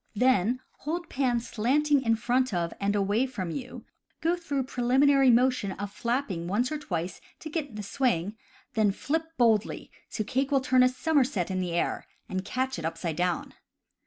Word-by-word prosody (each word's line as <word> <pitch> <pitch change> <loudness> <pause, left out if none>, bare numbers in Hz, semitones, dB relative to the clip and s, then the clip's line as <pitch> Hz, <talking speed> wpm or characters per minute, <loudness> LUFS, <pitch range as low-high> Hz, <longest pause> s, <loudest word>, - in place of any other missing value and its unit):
Then 250 0 +3 0.2
hold 335 +3 -4
pan 250 -3 +1
slanting 275 +6 +2
in 225 -3 +2
front 245 0 +1
of 170 -1 -1
and 205 +1 0
away 205 +6 +1
from 190 -9 -4
you, 255 +7 -7 0.3
go 335 +2 +1
through 290 -6 -2
preliminary 265 +2 +3
motion 245 -5 +3
of 200 +1 -6
flapping 235 -8 -2
once 240 +8 0
or 305 - -2
twice 175 - -4 0.2
to 310 - -8
get 295 -8 -3
the 210 - -5
swing, 205 -4 0 0.4
then 215 -2 +3
flip 315 +10 -2
boldly 225 -3 +2 0.2
so 215 - -2
cake 265 +5 -1
will 280 -2 +3
turn 255 -1 +3
a 255 - +6
somerset 255 - +1
in 185 0 -1
the 175 -2 -2
air, 170 - -1 0.2
and 185 -1 -3
catch 255 +1 -2
it 160 - -5
upside 165 0 -3
down. 180 0 -1
245 Hz, 175 wpm, -28 LUFS, 195-270 Hz, 0.4 s, a